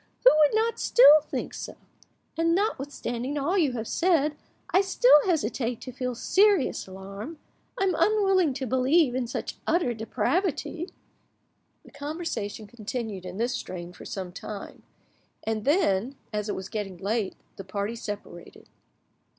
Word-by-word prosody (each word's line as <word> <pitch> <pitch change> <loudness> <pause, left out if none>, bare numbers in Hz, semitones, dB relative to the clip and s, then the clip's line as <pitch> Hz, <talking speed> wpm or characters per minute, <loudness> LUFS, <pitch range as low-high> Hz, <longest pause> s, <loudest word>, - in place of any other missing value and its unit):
—who - - +9
would 300 +5 +5
not 455 +1 +1
still 310 -11 +7
think 305 - -5
so? - - -7 0.6
And 330 +1 +2
notwithstanding 280 - -2
all 295 +7 0
you 310 -9 +2
have 225 -2 -4
said, 315 -4 +2 0.4
I 375 - +5
still 385 -4 +5
hesitate 245 - 0
to 255 - -7
feel 250 -1 -3
serious 390 - +2
alarm; 195 - -8 0.4
I - - +2
am 385 - +2
unwilling 385 -8 +3
to 270 -1 -3
believe 260 +3 +3
in 255 -1 -1
such 235 - -5
utter 320 -7 +2
depravity." 340 - -1 1.0
The - - -15
conversation 285 -8 -4
continued 215 -3 -5
in 180 +1 -7
this 240 +3 0
strain 180 -7 -6
for - - -12
some 185 -2 -5
time, 200 +2 -8 0.6
and 220 0 -2
then, 265 - +2 0.2
as 210 0 -2
it - - -1
was 190 - -6
getting 200 -4 -5
late, 200 +2 -1 0.2
the 195 - -6
party 200 +4 -3
separated. 205 -6 -8
255 Hz, 145 wpm, -27 LUFS, 210-330 Hz, 1.0 s, who